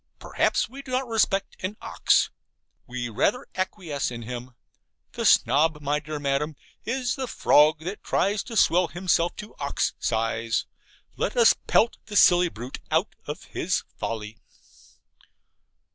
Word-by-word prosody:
Perhaps -, -, 0 dB
we 270 Hz, +4 st, -10 dB
do 275 Hz, -, -14 dB
not 255 Hz, 0 st, -1 dB
respect 215 Hz, -4 st, +1 dB
an 190 Hz, +3 st, -4 dB
ox. -, -, +2 dB, 0.6 s
We 120 Hz, 0 st, -4 dB
rather 120 Hz, -, 0 dB
acquiesce 185 Hz, -6 st, -2 dB
in 120 Hz, -1 st, -7 dB
him. 125 Hz, +1 st, -7 dB, 0.6 s
The -, -, -4 dB
Snob, 150 Hz, +2 st, +4 dB
my 145 Hz, 0 st, 0 dB
dear 150 Hz, 0 st, -6 dB
Madam, 145 Hz, +2 st, -1 dB, 0.3 s
is 245 Hz, +1 st, -1 dB
the 265 Hz, -2 st, -4 dB
Frog 150 Hz, -7 st, +4 dB
that 185 Hz, +5 st, -6 dB
tries 200 Hz, +1 st, +1 dB
to 230 Hz, -3 st, -5 dB
swell 180 Hz, -2 st, +4 dB
himself 175 Hz, 0 st, 0 dB
to 210 Hz, +1 st, -9 dB
ox 140 Hz, -1 st, -1 dB
size. 115 Hz, 0 st, -1 dB, 0.5 s
Let -, -, -2 dB
us 475 Hz, -, +7 dB
pelt 230 Hz, -, +3 dB
the 210 Hz, -, -7 dB
silly 175 Hz, -2 st, +6 dB
brute 120 Hz, -1 st, -8 dB
out -, -, +1 dB
of -, -, -5 dB
his -, -, -2 dB
folly. 110 Hz, 0 st, -5 dB
160 Hz, 145 wpm, -25 LUFS, 125-210 Hz, 0.6 s, us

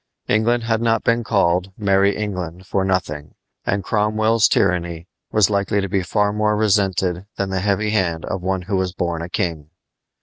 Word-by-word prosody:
England 115 Hz, +2 st, +2 dB
had 115 Hz, -1 st, 0 dB
not 115 Hz, -1 st, +1 dB
been 115 Hz, 0 st, +2 dB
called 95 Hz, -4 st, +1 dB
"Merry 100 Hz, -1 st, +2 dB
England" 95 Hz, -4 st, -4 dB
for 95 Hz, 0 st, 0 dB
nothing; 85 Hz, -6 st, -2 dB, 0.3 s
and 100 Hz, 0 st, 0 dB
Cromwell's 110 Hz, +2 st, +2 dB
tyranny 85 Hz, -1 st, 0 dB, 0.2 s
was 105 Hz, -2 st, +3 dB
likely 100 Hz, 0 st, +1 dB
to 100 Hz, -, -1 dB
be 95 Hz, 0 st, 0 dB
far 105 Hz, +3 st, 0 dB
more 105 Hz, 0 st, +1 dB
resented 95 Hz, -3 st, +1 dB
than 100 Hz, -1 st, -2 dB
the 95 Hz, -, 0 dB
heavy 105 Hz, +2 st, 0 dB
hand 85 Hz, -6 st, 0 dB
of 95 Hz, -, -3 dB
one 95 Hz, 0 st, -1 dB
who 95 Hz, +1 st, -1 dB
was 95 Hz, -1 st, -1 dB
born 85 Hz, -3 st, -2 dB
a 85 Hz, -, -6 dB
king. 85 Hz, -6 st, -3 dB
95 Hz, 175 wpm, -20 LUFS, 90-105 Hz, 0.3 s, was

